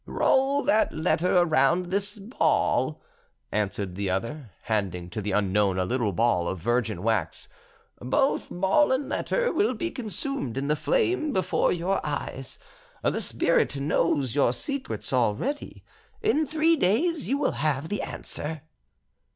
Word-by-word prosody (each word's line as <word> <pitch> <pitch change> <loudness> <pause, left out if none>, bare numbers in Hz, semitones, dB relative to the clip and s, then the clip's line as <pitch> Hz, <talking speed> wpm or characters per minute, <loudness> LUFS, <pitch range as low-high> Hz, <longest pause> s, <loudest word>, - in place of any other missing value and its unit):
"Roll 275 +2 +2
that 215 - +3
letter 175 +3 +1
around 175 +1 +3
this 200 +2 0
ball," 210 +6 0 0.5
answered 100 -2 -2
the 100 +1 -2
other, 115 +8 -3
handing 90 -5 -2
to 110 - -4
the 105 +1 -2
unknown 100 -1 +2
a 90 - +1
little 120 0 0
ball 95 -3 +1
of 95 - -2
virgin 115 -1 -1
wax. 110 -1 -1 0.5
"Both 130 - +1
ball 195 +12 +2
and 260 +2 0
letter - - 0
will 250 -5 +1
be 340 +9 -3
consumed 240 - -4
in 135 - -1
the 150 - +3
flame 370 - +1
before 185 - +1
your 180 +3 -1
eyes; 140 -3 -3 0.5
the - - +1
spirit - - +1
knows 140 -3 +1
your 140 -4 +3
secrets 275 - -3
already. 125 - -1 0.4
In 315 -8 +2
three 320 +2 +3
days 300 - +1
you 275 - +2
will 285 - +1
have 150 -1 0
the 205 - -2
answer." 150 -1 -5
155 Hz, 145 wpm, -26 LUFS, -, 0.5 s, that